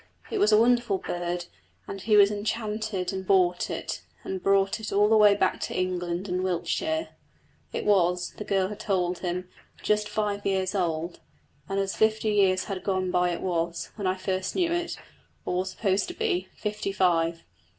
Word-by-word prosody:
It 430 - -1
was 215 - +4
a 210 - +7
wonderful 235 -3 +3
bird, 175 -1 -3 0.4
and 195 - -6
he 215 0 +3
was 200 0 +7
enchanted 210 -2 -2
and 190 0 -3
bought 180 -2 +2
it, - - -4 0.2
and 190 -1 -4
brought 195 +1 +2
it 220 - -5
all 205 +1 +4
the 220 - +4
way 210 -1 +7
back - - +1
to - - -3
England 180 0 -2
and 180 0 -1
Wiltshire. 315 - -1 0.6
It - - -3
was, 180 -3 +2
the - - -4
girl 195 -2 +1
had 210 - -7
told 180 -3 0
him, 180 0 -3 0.4
just 210 0 +1
five 205 -1 -1
years 190 -1 0
old, 170 -3 -1 0.5
and 195 0 0
as 195 0 -1
fifty 220 0 +2
years 185 -2 +3
had 195 -2 -5
gone 185 -2 0
by 180 0 +2
it 175 - -3
was, 170 -2 -2
when 200 -3 -3
I 185 - +1
first 185 0 -2
knew 345 -3 +1
it, 345 0 -2 0.5
or 180 - -1
was 185 +1 -1
supposed 195 0 0
to 355 - -7
be, 410 -5 -1
fifty 210 -2 -3
five. 170 -3 +1
195 Hz, 185 wpm, -27 LUFS, 180-210 Hz, 0.6 s, a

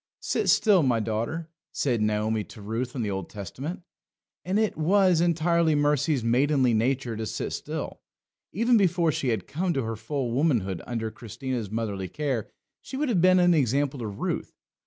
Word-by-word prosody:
"Sit - - 0
still, 205 -5 +5
my 125 -5 +2
daughter," 115 +10 -2 0.2
said 120 -6 0
Naomi 105 0 0
to 95 - -13
Ruth 115 +6 -4
in 125 - -1
the 105 - -2
Old 95 -2 -4
Testament. 135 - -6 0.6
And 185 +3 0
it 215 -1 +1
was 180 +1 +3
entirely 170 -1 +2
Mercy's 145 -2 +2
maidenly 130 +1 +3
nature 120 +1 0
to 110 0 -4
sit - - -3
still. - - -5 0.5
Even 230 +5 +3
before 175 -4 +3
she 135 - -2
had 110 -6 -1
come 175 +4 -1
to 135 - -1
her 115 0 -3
full 130 +2 -3
womanhood 115 - +1
under 115 -2 -3
Christiana's 115 0 -5
motherly 105 -3 -3
care 135 - -2 0.3
she 265 - -7
would 295 -1 0
have 195 -8 +2
been 185 +1 +6
an 175 0 +5
example 140 -1 +1
to 115 - -3
Ruth. 100 -1 -4
135 Hz, 175 wpm, -26 LUFS, 110-165 Hz, 0.6 s, been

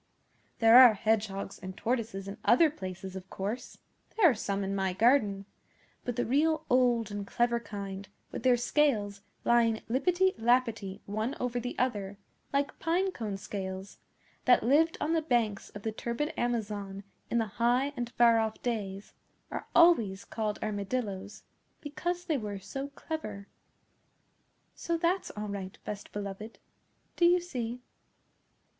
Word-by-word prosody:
There 225 +2 +8
are 245 -4 +9
Hedgehogs 205 -2 -1
and 185 0 -8
Tortoises 225 -5 -2
in 195 - -7
other 300 +6 +5
places, 190 -5 -7
of 190 0 -8
course 205 +6 -5 0.4
(there 415 -6 +7
are 290 - +5
some 200 -2 -2
in 195 0 -2
my 190 -1 0
garden); 210 -2 +3 0.6
but 245 - -3
the 245 - 0
real 310 +5 +2
old 245 -3 +3
and 205 -1 -5
clever 235 +1 +1
kind, 200 -3 -7 0.2
with - - -5
their 250 -1 +4
scales 230 -6 +1 0.2
lying 230 -2 +3
lippety 355 +10 +2
lappety 225 -4 +1
one 215 +5 -2
over 245 -1 -1
the 245 +1 -5
other, 205 -6 -1 0.3
like 280 0 -1
pine 365 +4 +1
cone 215 - -4
scales, 190 0 -6 0.5
that 250 - +5
lived 305 +7 +3
on 310 +2 0
the 325 - +2
banks 235 -9 0
of 205 - -10
the 220 - -1
turbid 235 +7 -3
Amazon 205 -4 -2 0.3
in 235 - +1
the 225 0 -2
High 250 +4 +3
and 240 -2 -3
Far 235 -1 +5
Off 220 -1 -1
Days, 205 -5 -3 0.4
are - - -5
always 230 - +5
called 215 -2 -3
Armadillos, 205 -1 -3 0.4
because 345 +4 -3
they 315 -6 0
were 205 -2 -4
so 200 +9 -5
clever. 215 -9 -6 1.3
So 335 0 -2
that; 350 +3 0
all 210 0 -4
right, 195 -2 -6
Best 205 -1 -6
Beloved. 205 +2 -6 0.6
Do 345 - +4
you 355 +1 +6
see? 250 -8 -5
230 Hz, 150 wpm, -30 LUFS, 200-260 Hz, 1.3 s, are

